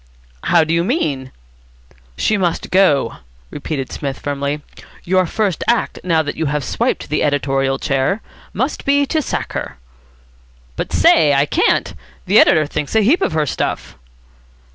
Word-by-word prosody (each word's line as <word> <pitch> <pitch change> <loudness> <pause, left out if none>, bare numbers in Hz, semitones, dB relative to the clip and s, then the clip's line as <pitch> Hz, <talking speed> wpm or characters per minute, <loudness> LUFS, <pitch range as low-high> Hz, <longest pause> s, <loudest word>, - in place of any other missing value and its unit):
"How - - +4
do 155 +1 -1
you 170 0 +2
mean?" 145 - -1 0.9
"She 215 - +1
must 180 -4 -1
go," 185 -7 +3 0.3
repeated 140 -2 -4
Psmith 140 -2 -4
firmly. 145 +1 -3 0.4
"Your 185 0 +2
first 200 -2 -1
act, 235 -1 0
now 165 -3 +2
that 145 - -4
you 160 -1 -2
have 145 0 -1
swiped 240 - -1
the 150 - 0
editorial 135 -1 0
chair, 140 +9 0 0.3
must 260 +6 -2
be 285 0 +3
to 315 +3 0
sack - - -4
her." - - -5 1.0
"But, - - -4
say, 150 -3 +4
I 140 +1 +3
can't. - - +1 0.3
The - - +5
editor 155 - +5
thinks 150 +5 -4
a 220 - +5
heap 285 - +3
of - - 0
her 155 -1 +1
stuff." - - -3
155 Hz, 155 wpm, -18 LUFS, 140-195 Hz, 1.0 s, The